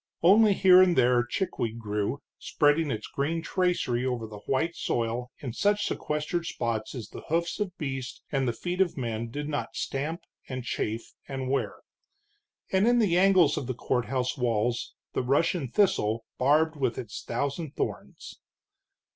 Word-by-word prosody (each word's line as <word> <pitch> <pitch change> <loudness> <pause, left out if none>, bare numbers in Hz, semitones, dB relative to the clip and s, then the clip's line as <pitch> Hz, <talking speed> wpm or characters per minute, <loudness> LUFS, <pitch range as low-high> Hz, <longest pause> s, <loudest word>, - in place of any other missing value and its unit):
Only 205 +4 +7
here 185 -1 +7
and 180 -2 +4
there 125 -1 +4
chickweed 120 - -2
grew, 105 +4 -2 0.2
spreading 150 +1 +2
its 110 -4 -3
green 160 +4 -2
tracery 175 -10 0
over 125 -3 -1
the 105 -1 -9
white 160 +6 0
soil 120 +1 -2
in 125 -5 -5
such 205 - +2
sequestered 150 +3 -2
spots 115 -5 -2
as 120 -4 -6
the - - -9
hoofs 170 +4 0
of 195 -3 -3
beast 135 -4 -5
and 135 -2 +1
the - - +2
feet 175 +10 -2
of 180 -5 +1
men 115 -2 -3
did 145 +4 -4
not 150 -1 -3
stamp 150 +5 -3 0.3
and 130 -1 -4
chafe 115 -1 -3
and 135 -1 -3
wear; 140 - -1 0.9
and 190 +3 +3
in 240 0 +5
the 205 -7 +3
angles 185 -3 +5
of 130 - -3
the 130 - -2
courthouse 125 +1 -1
walls, 120 -2 -1 0.2
the - - 0
Russian 140 +4 +1
thistle, 115 - +1
barbed 155 +4 +3
with 130 -4 0
its 115 -3 -6
thousand 140 +5 -3
thorns. - - -5
135 Hz, 160 wpm, -28 LUFS, 120-170 Hz, 0.9 s, Only